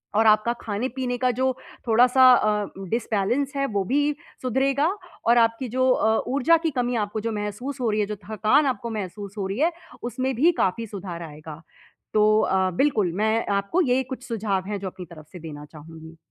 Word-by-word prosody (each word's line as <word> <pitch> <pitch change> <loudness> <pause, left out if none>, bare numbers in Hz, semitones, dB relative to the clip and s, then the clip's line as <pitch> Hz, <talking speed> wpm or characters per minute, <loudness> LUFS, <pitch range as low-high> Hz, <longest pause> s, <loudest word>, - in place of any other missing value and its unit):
और 220 +1 +4
आपका 215 +2 +4
खाने-पीने 245 +3 -3
का 250 0 +2
जो 260 +2 +1 0.4
थोड़ा-सा 250 +3 +6
अ, 210 -3 +2 0.2
डिसबैलेंस 240 - 0
है, 275 0 0
वो 205 -5 -1
भी 290 +7 +1 0.3
सुधरेगा 270 +4 +1 0.4
और 235 +1 +5
आपकी 230 +2 +2
जो 255 +2 +1
अ, 220 -2 +2
ऊर्जा 285 +6 +3
की 315 - 0
कमी 245 0 0
आपको 205 +2 -5
जो 230 - -2
महसूस 210 +7 -5
हो 235 - +1
रही 210 - 0
है, - - +1
जो 210 - -4
थकान 220 +7 +3
आपको 235 -3 -2
महसूस 205 -1 -6
हो 190 - -1
रही 200 +6 -4
है, 330 +3 +3 0.3
उसमें 255 +2 -2
भी 315 +8 +4
काफ़ी 225 +5 -1
सुधार 185 -4 -7
आएगा। 155 0 -10 0.5
तो 215 0 +4
अ, 190 -2 +1
बिल्कुल 210 - +1
मैं 220 +1 +1
आपको 200 - +1
ये 260 -4 +2
कुछ 255 0 -8
सुझाव 205 -5 -2
हैं, 205 -1 -3
जो 195 - -5
अपनी 180 0 -8
तरफ 155 -2 -13
से 180 - -8
देना 150 -2 -9
चाहूँगी। 160 +2 -13
220 Hz, 190 wpm, -24 LUFS, 200-255 Hz, 0.5 s, थोड़ा-सा